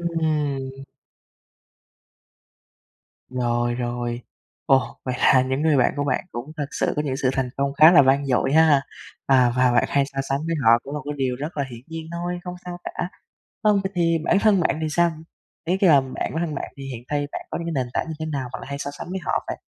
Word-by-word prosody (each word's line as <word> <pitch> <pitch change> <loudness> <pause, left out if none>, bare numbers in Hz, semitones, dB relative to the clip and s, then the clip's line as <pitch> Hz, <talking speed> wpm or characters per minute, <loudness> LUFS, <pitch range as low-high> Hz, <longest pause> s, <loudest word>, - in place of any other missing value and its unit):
Ừm. 150 -5 -2 2.4
Rồi, 120 -1 0
rồi. 120 0 -3 0.5
Ồ! 135 -1 +2
Vậy 130 - -2
là 130 - +5
những 130 +3 -1
người 160 -2 +3
bạn 125 - +3
của 145 - 0
bạn 145 - 0
cũng 120 +6 -6
thật 145 - -2
sự - - -1
có 150 - +1
những 135 -3 -2
sự 130 -1 +1
thành 130 -1 -1
công 140 0 0
khá 155 +4 +8
là 155 - +8
vang 135 +1 +3
dội 135 +1 +1
ha! 155 -3 +5 0.4
À, 125 -3 +4
và 125 -1 +4
bạn 120 - +4
hay 140 -1 +2
so 140 -1 -9
sánh 135 +1 0
với 165 - 0
họ 115 +1 +7
cũng 140 - -7
là 150 - -3
cái 145 - -3
điều 130 -2 -1
rất 150 +6 -6
là 140 - 0
hiển 120 -1 -9
nhiên 165 0 -7
thôi, 175 +1 -3
không 180 -1 -5
sao 175 -1 -6
cả. 175 - -4 0.5
Vâng, 210 -2 +4
vậy 190 - -2
thì 165 -2 +2
bản 190 - +3
thân 205 -2 +4
bạn 160 - +1
thì 155 - 0
sao? 170 +2 +3 0.5
Ý 175 +3 +1
cái 190 -2 +4
là 145 -3 +7
bạn 130 -1 -8
bản - - -3
thân 155 - -5
bạn - - -5
thì 140 - -8
hiện 120 -3 -7
thay 145 -1 -1
bạn - - -6
có - - -3
những 170 - -5
cái 130 -2 0
nền 125 - -11
tảng - - 0
như 160 - -4
thế 155 - -2
nào 140 -5 -3
bạn - - -6
lại - - -9
hay 140 0 -4
so 140 - -4
sánh 145 +4 -9
với 190 +1 -3
họ - - -1
vậy? - - -4
140 Hz, 240 wpm, -23 LUFS, 130-160 Hz, 2.4 s, khá